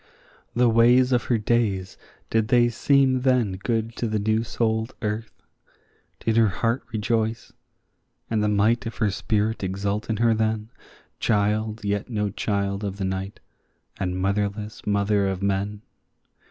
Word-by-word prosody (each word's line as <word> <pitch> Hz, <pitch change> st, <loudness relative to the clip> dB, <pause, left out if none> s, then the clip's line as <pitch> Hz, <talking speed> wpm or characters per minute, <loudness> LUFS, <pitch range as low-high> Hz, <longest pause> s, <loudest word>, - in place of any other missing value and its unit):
The 125 Hz, +1 st, +4 dB
ways 120 Hz, +3 st, +5 dB
of 125 Hz, -1 st, +2 dB
her 120 Hz, -, +2 dB
days, 105 Hz, -4 st, 0 dB, 0.4 s
did 110 Hz, -1 st, +2 dB
they 120 Hz, 0 st, +4 dB
seem 130 Hz, +1 st, +3 dB
then 125 Hz, -5 st, +2 dB
good 115 Hz, +2 st, -2 dB
to 120 Hz, -, -1 dB
the 110 Hz, 0 st, -1 dB
new 110 Hz, +2 st, +1 dB
souled 110 Hz, -1 st, -1 dB
earth? 110 Hz, +1 st, -4 dB, 0.8 s
Did 115 Hz, 0 st, 0 dB
her 115 Hz, -1 st, +5 dB
heart 115 Hz, +6 st, 0 dB
rejoice, 110 Hz, +1 st, -1 dB, 0.7 s
and 110 Hz, -2 st, 0 dB
the -, -, +2 dB
might 110 Hz, +3 st, +2 dB
of 115 Hz, -, -7 dB
her 105 Hz, -3 st, +1 dB
spirit 105 Hz, +2 st, -1 dB
exult 100 Hz, +3 st, -2 dB
in 110 Hz, -, 0 dB
her 115 Hz, +1 st, +3 dB
then, 110 Hz, 0 st, -1 dB, 0.5 s
Child 105 Hz, 0 st, 0 dB
yet 100 Hz, +2 st, -1 dB
no 105 Hz, -3 st, -1 dB
child 100 Hz, 0 st, -2 dB
of 100 Hz, -1 st, -3 dB
the 95 Hz, -, -2 dB
night, 95 Hz, +1 st, -4 dB, 0.6 s
and 90 Hz, -2 st, -2 dB
motherless 100 Hz, +3 st, -2 dB
mother 100 Hz, -1 st, +2 dB
of 95 Hz, 0 st, -3 dB
men? 100 Hz, +1 st, -1 dB
110 Hz, 150 wpm, -24 LUFS, 100-115 Hz, 0.8 s, ways